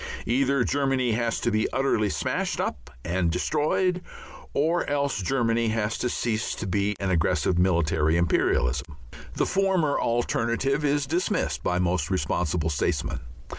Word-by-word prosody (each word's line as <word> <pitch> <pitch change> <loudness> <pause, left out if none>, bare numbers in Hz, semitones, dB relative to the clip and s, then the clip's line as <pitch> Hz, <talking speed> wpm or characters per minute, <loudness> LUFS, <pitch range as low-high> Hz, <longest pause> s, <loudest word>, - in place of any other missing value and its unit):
Either 135 +1 +2
Germany 135 -2 +1
has 115 +1 0
to 120 - +1
be 110 0 0
utterly 125 -6 +1
smashed - - -2
up 65 -5 -3 0.2
and 85 0 0
destroyed 155 - 0 0.5
or 165 +4 +1
else 140 -5 0
Germany 115 +2 +1
has 110 0 0
to 125 - 0
cease 115 -2 -1
to - - -5
be 100 +2 0
an 95 -1 -1
aggressive 85 0 +1
military 85 -3 +2
imperialism. 70 -5 +1 0.4
The - - +1
former 190 -6 +1
alternative 120 +4 0
is 145 -1 +1
dismissed 170 +7 -1
by 90 - 0
most 90 -3 0
responsible 80 -2 0
statesmen. 75 +1 -1
110 Hz, 135 wpm, -26 LUFS, 90-135 Hz, 0.5 s, Either